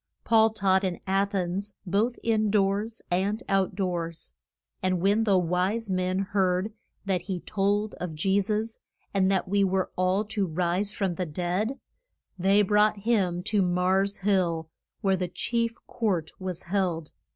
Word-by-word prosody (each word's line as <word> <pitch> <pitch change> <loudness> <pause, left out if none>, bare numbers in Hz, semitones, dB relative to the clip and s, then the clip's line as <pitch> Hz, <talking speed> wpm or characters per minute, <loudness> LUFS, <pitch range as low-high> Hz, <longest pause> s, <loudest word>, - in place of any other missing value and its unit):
Paul 225 -1 +5
taught 195 -3 +2
in 180 -3 -1
A 195 +1 +2
thens, 195 +1 -3
both 210 +6 +1
in 215 -2 +2
doors 205 +2 0
and 200 +6 0
out 195 -1 +1
doors. 170 - -3 0.5
And 185 -1 +1
when 205 +5 +2
the 200 -3 +4
wise 185 +5 0
men 185 0 0
heard 190 +1 +1 0.3
that 190 -3 0
he 180 0 -4
told 205 +1 0
of 175 -3 -4
Je 190 +6 +2
sus, 215 +3 -2 0.3
and 190 -1 +3
that 190 -1 +1
we 200 +1 +2
were 190 -1 0
all 185 +3 +1
to 205 -2 -1
rise 180 +4 0
from 195 -4 -1
the 180 0 -3
dead, 180 - -2 0.6
they 195 +3 +4
brought 210 +1 +3
him 190 -6 +1
to 210 0 +1
Mars' 185 +2 +2
Hill, 170 -5 +1 0.3
where 195 -1 +2
the 180 0 -1
chief 230 +5 -1
court 185 -9 -1
was 185 -2 -5
held. 175 -4 -1
195 Hz, 155 wpm, -27 LUFS, 180-210 Hz, 0.6 s, Paul